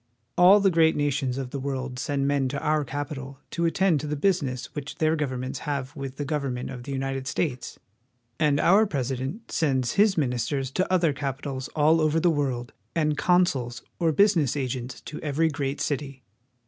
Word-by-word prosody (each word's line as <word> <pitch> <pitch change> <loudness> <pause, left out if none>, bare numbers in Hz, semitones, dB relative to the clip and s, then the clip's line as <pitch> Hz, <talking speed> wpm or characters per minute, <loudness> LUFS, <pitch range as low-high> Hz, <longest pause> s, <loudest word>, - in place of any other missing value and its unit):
All 185 +4 +7
the 195 -1 +3
great 160 -1 +4
nations 140 -3 0
of 130 -2 -4
the 140 - -4
world 130 -2 -4
send 140 +1 -1
men 140 -2 +1
to 140 - -3
our 155 0 +1
capital 140 -1 -5
to 170 - -1
attend 170 -1 +2
to 150 - -5
the 150 - -1
business 145 -6 0
which 145 -1 -6
their 155 0 +2
govern 135 -5 -2
ments 130 +1 -4
have 140 -1 -4
with 135 -2 -6
the 145 - -3
government 135 -4 -2
of 125 -2 -7
the 140 - -7
United 135 0 -3
States; 140 -5 -2 0.6
and 150 -2 +3
our 205 +7 +5
President 135 - -3
sends 130 -6 +1
his 205 -2 +3
ministers 130 -1 -1
to 185 +5 -1
other 170 -5 +3
capitals 135 0 -4
all 155 +2 +4
over 155 +1 +2
the 175 +1 +3
world, 130 -5 -2 0.2
and 155 -2 +1
consuls 145 -9 +1 0.2
or 165 -2 +3
business 165 - +3
agents 125 -2 -4
to 155 - -8
every 155 +2 +1
great 140 -1 -3
city. 140 -2 -3
145 Hz, 185 wpm, -26 LUFS, 130-160 Hz, 0.6 s, All